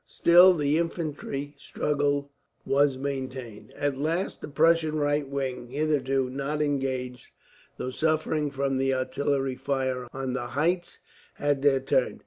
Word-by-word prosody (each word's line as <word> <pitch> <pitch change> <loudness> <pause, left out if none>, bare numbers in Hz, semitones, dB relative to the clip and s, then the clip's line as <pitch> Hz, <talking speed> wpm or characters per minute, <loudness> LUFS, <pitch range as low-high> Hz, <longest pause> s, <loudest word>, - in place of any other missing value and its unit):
Still 180 +2 +6
the 150 0 +1
infantry 150 -4 -3
struggle 145 0 -1 0.3
was 140 -1 +2
maintained. 130 -5 -5
At 140 -2 -1
last 165 +6 -1
the - - -6
Prussian 160 +1 +3
right 145 -1 0
wing, 130 -3 -3
hitherto 135 -1 0
not 140 +3 -3
engaged, 130 -4 -2 0.5
though 130 - -4
suffering 155 0 0
from 135 -1 -1
the 135 0 +1
artillery 135 +1 -1
fire 130 -2 -2
on 130 -1 -4
the 120 -2 -3
heights, 175 +3 0 0.4
had 145 -1 0
their 135 -2 +3
turn. 135 - 0
140 Hz, 130 wpm, -27 LUFS, 130-150 Hz, 0.5 s, Still